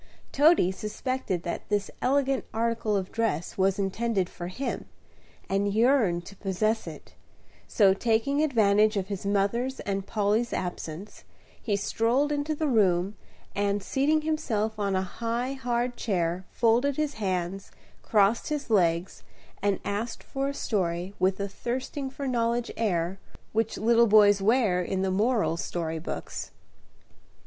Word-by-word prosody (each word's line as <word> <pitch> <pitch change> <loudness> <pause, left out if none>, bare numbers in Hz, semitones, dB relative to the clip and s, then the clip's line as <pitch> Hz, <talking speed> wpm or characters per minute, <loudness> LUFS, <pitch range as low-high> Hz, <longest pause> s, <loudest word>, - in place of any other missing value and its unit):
Toady 290 - +5
suspected 210 -2 -3
that 170 - -5
this 205 -1 0
elegant 270 0 +1
article 225 -2 0
of 185 -1 -4
dress 220 -8 -1
was 190 0 +2
intended 200 -1 0
for 175 - -6
him, 255 +10 -4 0.6
and 200 +1 0
yearned 220 -6 +3
to 200 - -11
possess 215 +3 -1
it; - - -10 0.5
so, 195 -3 +4
taking 230 +7 +1
advantage 215 -6 +3
of 195 0 -2
his 200 -1 -4
mother's 220 +6 0
and 195 -1 -3
Polly's 215 +2 +1
absence, 180 +1 -5 0.4
he 210 - 0
strolled 235 +8 +1
into 295 +1 -1
the 310 +1 -1
room, 195 -5 +2 0.4
and, 200 0 0
seating 295 +7 +1
himself 225 -9 -1
on 200 -2 0
a 185 - +1
high, 235 +6 -3
hard 245 -2 -1
chair, 180 -3 -1
folded 245 +4 +2
his 305 -1 0
hands, 185 0 -2 0.3
crossed 210 +1 +2
his 295 -5 -3
legs, 175 -3 +1 0.4
and 200 -1 +1
asked 220 +4 -3
for 275 0 -3
a 280 - -2
story 180 -5 -1
with 190 +1 +2
the 200 - -2
thirsting 260 +6 -4
for 275 +1 -5
knowledge 235 -1 0
air 185 -4 -1 0.3
which 225 0 0
little 235 +1 +4
boys 205 -2 +6
wear 210 -4 +3
in 190 +2 -1
the 190 - 0
moral 215 -3 +1
story 165 -1 -3
books. 160 - -5
210 Hz, 140 wpm, -27 LUFS, 190-240 Hz, 0.6 s, boys